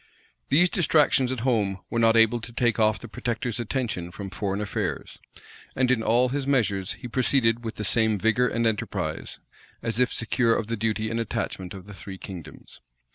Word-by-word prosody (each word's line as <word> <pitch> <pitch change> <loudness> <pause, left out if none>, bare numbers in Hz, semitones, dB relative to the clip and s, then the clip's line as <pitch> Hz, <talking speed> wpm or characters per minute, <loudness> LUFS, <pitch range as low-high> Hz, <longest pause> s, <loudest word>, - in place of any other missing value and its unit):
These 170 +6 +4
distractions 150 -6 +3
at 130 -3 -3
home 110 -6 +1
were 115 - 0
not 115 0 +5
able 115 +1 +4
to 115 - -8
take 120 -1 +1
off 110 -1 +3
the 120 - -10
protector's 120 +1 -3
attention 115 -7 -2
from 95 0 -7
foreign 100 0 -2
affairs; 100 - -3 0.6
and 130 -1 +2
in 120 -3 +2
all 120 +3 +3
his 140 +1 -2
measures, 100 -9 +1
he 110 +4 -9
proceeded 120 -1 +2
with 115 - -5
the 105 - -4
same 110 -1 +2
vigor 115 +5 +2
and 115 -1 -1
enterprise, 110 -2 -2 0.5
as 115 0 -1
if 125 - +3
secure 115 0 +1
of - - -1
the 115 +2 -2
duty 110 0 -1
and 115 - -1
attachment 95 -4 -3
of 95 -1 -10
the 100 - -11
three 95 0 -9
kingdoms. 90 -5 -10
115 Hz, 185 wpm, -25 LUFS, 105-125 Hz, 0.6 s, not